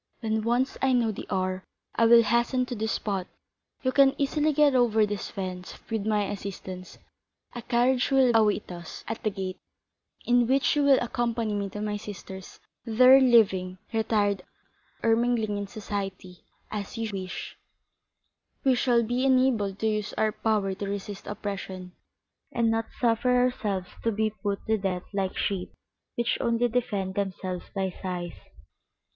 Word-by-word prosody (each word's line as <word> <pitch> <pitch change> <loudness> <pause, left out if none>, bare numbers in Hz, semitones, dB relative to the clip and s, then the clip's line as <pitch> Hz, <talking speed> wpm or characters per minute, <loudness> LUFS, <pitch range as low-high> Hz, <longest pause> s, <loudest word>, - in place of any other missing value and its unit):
When 220 -1 0
once 240 +4 0
I 265 -1 +3
know 235 -3 +2
the 205 - -8
hour, 185 0 -1 0.3
I 230 - +3
will 230 0 +8
hasten 235 +3 +1
to 250 - -5
this 220 0 -1
spot, 195 -3 -2 0.6
you 260 - +2
can 275 0 +4
easily 300 +2 +1
get 295 -1 +4
over 225 -4 +4
this 205 -2 -4
fence 185 -2 -6
with 220 -2 -1
my 210 -1 +2
assistance, 190 -2 -6 0.6
a 240 - -6
carriage 245 +2 +2
will 265 -3 +4
await 215 -3 +2
us 175 -1 -8
at 225 +1 -4
the 215 - +1
gate, 190 -2 -5 0.7
in 245 -1 +3
which 270 +3 +2
you 295 - +2
will 280 -2 +6
accompany 235 -2 -1
me 200 -1 -2
to 210 - -6
my 210 0 -2
sister's; 190 -2 -9 0.2
there 255 +3 +6
living, 195 -7 +4 0.2
retired 210 -3 +1 0.6
or 225 -1 +4
mingling 230 -3 0
in 200 - -4
society, 195 -3 -6 0.3
as 210 +2 -5
you 225 -1 -2
wish, 185 -2 -5 1.1
we 265 - +4
shall 240 -1 +3
be 245 +3 -1
enabled 255 -7 +2
to 220 - -1
use 215 -1 -1
our 215 0 +1
power 210 -3 0
to 200 +1 -5
resist 200 0 -6
oppression, 190 -3 -5 0.6
and 230 -1 +1
not 225 0 0
suffer 245 +1 +2
ourselves 210 -7 0
to 230 - +2
be 215 0 0
put 200 -2 -2
to 220 -1 +1
death 185 -2 -2
like 195 -2 -2
sheep, 190 -3 -2 0.4
which 235 0 0
only 235 +1 +2
defend 205 -6 -1
themselves 190 -2 -3
by 190 -2 -1
sighs." 175 -2 -4
215 Hz, 160 wpm, -27 LUFS, 195-240 Hz, 1.1 s, will